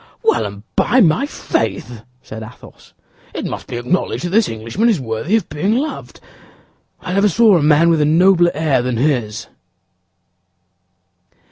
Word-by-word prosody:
"Well, 445 -1 +1
and 100 0 -11
by 260 - +2
my 195 - +3
faith," 110 - -3 0.2
said 110 - -9
Athos, 110 +3 -14 0.4
"it - - -4
must - - -6
be - - -5
acknowledged 125 +11 -2
that - - -2
this 220 +2 +2
Englishman 115 - -1
is 210 -8 +1
worthy 125 - -2
of 220 -6 0
being 190 +10 -1
loved. 305 +4 -5 0.8
I 180 - -5
never 200 +2 +3
saw 220 +1 +4
a 170 - +2
man 155 +3 +4
with 160 -2 +2
a - - +3
nobler 175 +3 +4
air 150 -5 +1
than 125 -1 -2
his." 120 -5 -1
155 Hz, 155 wpm, -17 LUFS, 120-195 Hz, 0.8 s, saw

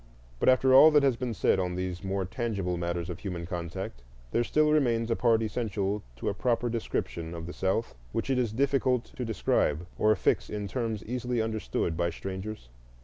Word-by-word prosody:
But - - +4
after 130 0 +5
all 135 +4 +10
that 150 -2 +4
has 135 -3 +3
been 120 -1 -3
said 95 - +2
on 90 -1 -1
these 90 0 -4
more 95 0 -1
tangible 100 -4 -2
matters 85 0 -2
of 90 -3 -6
human 90 -4 -4
contact, 90 -5 -5 0.3
there 120 - +2
still 150 +4 +3
remains 120 -6 +2
a - - +3
part 115 -2 +3
essential 105 -2 -1
to 60 - -5
a - - +1
proper 120 +2 0
description 85 -7 -3
of 85 -1 -6
the 90 - -6
South 95 +5 -1 0.2
which - - -2
it 130 - +2
is 120 -4 0
difficult 130 0 +1
to 125 - -3
describe 90 -7 +1
or 110 0 +4
fix - - +1
in 105 -1 -3
terms 115 -3 -3
easily 125 +1 -2
understood 110 -6 -1
by 85 +1 +1
strangers. 95 - -6
110 Hz, 195 wpm, -29 LUFS, 90-120 Hz, 0.3 s, all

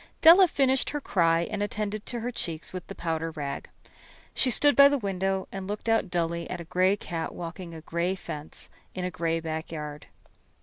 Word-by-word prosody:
Della 355 +4 +9
finished 270 -4 +2
her 295 - -2
cry 165 -10 +2
and 205 +4 -3
attended 210 0 -3
her 240 0 -3
cheeks 165 -8 -3
with 185 -1 -6
the - - -8
powder 165 -1 -2
rag. 145 -3 -5 0.6
She 260 - +2
stood 290 +4 +5
by 280 0 +9
the 285 0 +2
window 195 -3 -1
and 195 -1 -6
looked 210 +3 -5
out 225 -4 +2
dully 170 -1 -1
at - - -4
a - - -5
gray 185 +4 +2
cat 165 -4 -4
walking 170 0 -7
a 160 - -8
gray 170 +4 -1
fence 150 -5 -8 0.2
in 185 -1 -2
a 180 - -2
gray 165 0 -1
backyard. 155 -2 -5
180 Hz, 185 wpm, -27 LUFS, 165-215 Hz, 0.6 s, Della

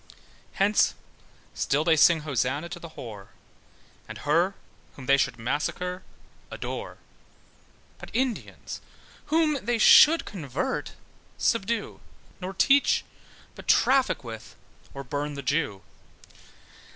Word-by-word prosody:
Hence 200 +2 +2 0.6
still 145 +3 0
they 165 -1 +4
sing 160 +1 +5
hosanna 145 +2 -2
to 175 0 -7
the 170 - -9
whore, 105 -5 -9 0.8
And - - -8
her, 170 +6 +1 0.4
whom 135 - -10
they 135 - +5
should 135 -3 0
massacre, 155 +9 -3 0.5
adore: - - -6 1.0
But - - -10
Indians, 250 -1 -3 0.5
whom 305 -3 +1
they 235 +2 0 0.3
would 330 +2 -1
convert, 180 - -4 0.4
subdue; 230 -1 -1 0.4
Nor 190 +1 -6
teach, 280 +7 +3 0.5
but - - -13
traffic 265 - +3
with, 115 -2 -9 0.4
or 140 - -6
burn 145 +2 -4
the 140 - -6
Jew. 130 -7 -1
165 Hz, 110 wpm, -26 LUFS, 140-210 Hz, 1.0 s, sing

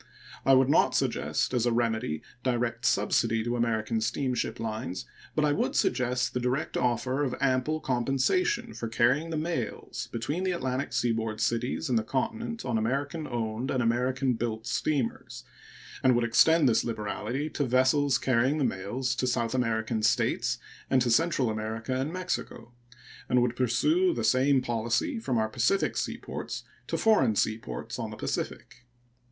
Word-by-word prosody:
I 135 - +7
would 130 0 +5
not 140 - +3
suggest - - 0
as 120 -1 +2
a - - +2
remedy 110 -9 -1 0.2
direct 120 -2 -1
subsidy 115 -1 +2
to 120 +1 -1
American 115 -1 0
steamship 125 -1 -1
lines, 110 -4 -4 0.3
but 155 - +3
I 150 - +2
would 145 - 0
suggest 125 0 +1
the 125 - 0
direct 125 +4 -1
offer 130 +3 0
of 130 -4 0
ample 135 +3 +1
compensation 135 - 0
for 115 - -5
carrying 125 +8 +2
the 160 - -2
mails 155 -9 -3
between 150 +11 -2
Atlantic 130 -6 -2
Seaboard 115 -3 0
cities 120 +6 -1
and 120 -4 +2
the - - -3
Continent 225 - -3
on 115 -3 0
American 140 +7 -2
owned 115 +1 -3
and 130 -3 +1
American 125 +3 +1
built 115 -1 -3
steamers, 125 0 -2 0.6
and 130 -1 +4
would 120 - +2
extend 145 +6 +5
this 115 - +3
liberality 115 +5 -3
to 145 - -1
vessels 130 +2 +3
carrying 130 +3 +2
the 150 - +1
mails 125 +5 -1
to 125 - 0
South 120 -2 0
American 115 -3 0
States - - +1 0.3
and 130 - +4
to 120 - +1
Central 155 -1 +2
America 110 +3 -3
and 135 +4 -1
Mexico, 185 -8 -4 0.6
and 125 0 +4
would 120 -1 0
pursue 315 - +2
the - - -2
same 130 +1 +3
policy 120 - -1
from 130 - -1
our 110 -1 +2
Pacific 120 - +1
seaports - - -4 0.2
to - - -1
foreign 135 - +3
seaports 100 - -2
on - - -3
the - - -8
Pacific. 120 0 -5
125 Hz, 160 wpm, -28 LUFS, 115-135 Hz, 0.6 s, I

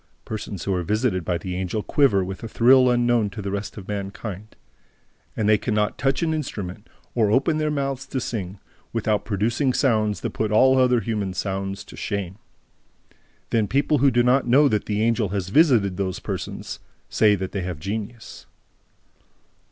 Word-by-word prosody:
Persons 105 -5 -5
who 100 - -1
are 90 - 0
visited 105 0 0
by 85 +1 -1
the 90 +1 -5
Angel 95 +3 -2
quiver 110 -10 +3
with 95 +1 -6
a 115 - -5
thrill 125 +3 +5
unknown 120 -3 +2
to 100 - -9
the 100 -1 -4
rest 100 +2 -4
of 95 - -9
mankind. 100 0 -6 0.8
And 110 - 0
they 105 -1 +4
can 110 - -2
not 105 -1 0
touch 135 +3 +1
an 160 -1 +1
instrument, 105 - -5 0.2
or 110 -3 +2
open 145 +7 +2
their 155 0 0
mouths 135 -2 -2
to 130 - -2
sing, 100 -6 -4 0.4
without 110 -2 0
producing 115 +6 0
sounds 110 -6 +1
that - - -3
put 110 -1 -2
all 130 +5 +5
other 125 -2 +3
human 100 -3 -3
sounds 95 +1 -3
to - - -13
shame. 100 -2 -4 1.1
Then 110 -3 +2
people 140 +5 +1
who 140 +2 +5
do 120 -1 +2
not 125 +1 +3
know 140 +5 +5
that 105 -4 -1
the 105 0 0
Angel 115 -3 +1
has 95 -1 -3
visited 110 - +4
those 95 -2 -2
persons - - -5 0.3
say 105 -2 +3
that 95 -1 -4
they 100 - -3
have 90 -3 -4
genius. 110 +6 -6
110 Hz, 180 wpm, -23 LUFS, 100-125 Hz, 1.1 s, thrill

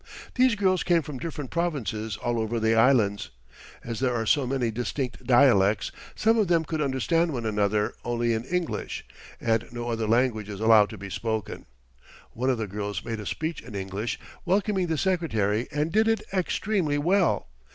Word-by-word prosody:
These 255 -2 +4
girls 190 -3 +2
came 170 -3 +2
from 140 -3 -7
different 150 -4 -5
provinces 115 - -2
all 120 0 -1
over 110 +1 -1
the 110 0 +2
Islands. 110 -4 +3 0.5
As 115 -2 -5
there 130 -2 +1
are 115 -1 -1
so 140 +2 +2
many 125 -3 0
distinct 125 +2 -4
dialects, 120 -6 +4 0.2
some 225 +1 +3
of 210 - +2
them 165 -2 +2
could 155 0 -2
understand 150 +5 +1
one 120 -3 -3
another 105 -1 +1
only 120 -1 0
in 110 0 -2
English, 180 +2 -3 0.3
and 115 -1 0
no 120 0 -4
other 115 -2 -1
language 115 -2 +1
is 100 -2 -6
allowed 110 -2 +5
to 110 - -8
be 100 0 -8
spoken. 110 -1 -3 0.6
One 130 +3 -1
of 130 - +2
the 110 - -2
girls 105 +1 -4
made 115 -2 -3
a 105 - -6
speech 160 0 -3
in 115 -3 -10
English 100 +4 -3 0.2
welcoming 190 0 +1
the 160 -1 -1
Secretary 120 - 0
and 150 +2 -1
did 220 +3 +3
it 225 0 +1
extremely 185 -4 0
well. 180 +5 +2
120 Hz, 180 wpm, -26 LUFS, 110-165 Hz, 0.6 s, allowed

